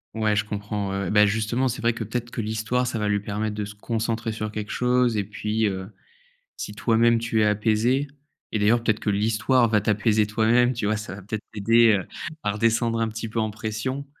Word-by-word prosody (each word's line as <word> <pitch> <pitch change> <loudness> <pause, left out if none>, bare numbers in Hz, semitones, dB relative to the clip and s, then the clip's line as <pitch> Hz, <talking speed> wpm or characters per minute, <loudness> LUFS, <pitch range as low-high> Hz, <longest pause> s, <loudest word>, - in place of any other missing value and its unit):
Ouais, 110 -1 +1
je 100 -1 +1
comprends, 105 -1 -3
ouais, 100 0 -2
ouais. - - -2
Bah, 105 0 +6
justement, 110 +5 0
c'est 125 - -3
vrai, 115 +1 +2
que, 115 - -4
peut-être 120 +2 -4
que - - -3
l'histoire, 110 +3 -1
ça 120 - -2
va 105 -1 -1
lui 100 0 +2
permettre 105 +1 -3
de 105 -1 -3
se 105 +1 -10
concentrer 115 +1 -2
sur 110 -1 -4
quelque 105 -1 -5
chose 125 -2 +2
et 105 - +1
puis, 105 +2 -1
heu, 95 -1 -4 0.7
si 105 - -5
toi-même, 115 +1 +3
tu 115 -1 0
es - - +4
apaisé 110 +6 +2 0.5
et 110 - +1
d'ailleurs, 115 +3 +3
peut-être 110 -1 +1
que - - -2
l'histoire 110 +4 +2
va 110 -1 +3
t'apaiser 105 +1 +2
toi-même, 115 +3 +3
tu 115 -3 -3
vois? 105 +1 +1
Ça 105 -3 -6
va, 100 - -10
peut-être, 105 +3 -5
t'aider, 115 +2 +4
heu, 90 - -7 0.4
à 105 - +1
redescendre 115 +1 +1
un 115 - +1
petit 115 +1 -5
peu 115 - -2
en 110 -1 0
pression, 110 +6 -4
110 Hz, 225 wpm, -24 LUFS, 105-115 Hz, 0.7 s, Bah